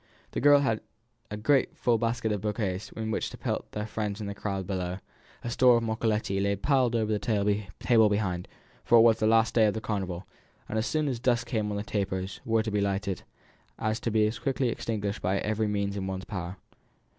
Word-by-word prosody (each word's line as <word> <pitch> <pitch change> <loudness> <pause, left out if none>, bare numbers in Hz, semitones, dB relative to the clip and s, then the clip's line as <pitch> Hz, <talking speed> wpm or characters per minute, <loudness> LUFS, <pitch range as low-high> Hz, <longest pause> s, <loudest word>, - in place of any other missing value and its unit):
The - - -3
girls 145 +1 +6
had 115 -5 0 0.5
a 105 - -5
great 135 +5 +3
basket - - -29
full 115 -1 +1
of 100 - -3
bouquets 105 -3 -2
with 110 0 -4
which 110 - -1
to - - -10
pelt - - -3
their 105 0 -3
friends 105 -1 -3
in 105 - -4
the 100 - -4
crowd 100 -2 -3
below; 90 -1 -3 0.5
a 120 - -3
store 125 0 +5
of 115 - -1
moccoletti 110 -3 0
lay 100 0 +1
piled 125 +2 +2
on 115 -1 +2
the 105 -1 0
table 105 +1 +2
behind, 95 -4 -1 0.4
for 120 - +5
it - - +8
was 115 -1 +5
the 110 - +2
last 110 0 +4
day 110 -2 +5
of 105 +1 0
Carnival, 95 -4 -3 0.4
and 110 - -1
as 110 - -1
soon 155 -1 0
as 125 -4 -2
dusk 120 -1 +1
came 110 -4 -1
on 105 - -2
the 100 - -2
tapers 95 -3 -3
were 115 -1 +2
to 110 - -3
be 105 0 +1
lighted, 100 -1 -1 0.8
to - - -1
be 110 -1 +3
as 110 +2 -2
quickly 135 -3 0
extinguished 105 -3 -3
by 95 +2 +1
every 110 +1 0
means 100 -1 -1
in 100 - -3
everyone's 95 0 -4
power. 95 -2 -5
105 Hz, 215 wpm, -28 LUFS, 100-115 Hz, 0.8 s, it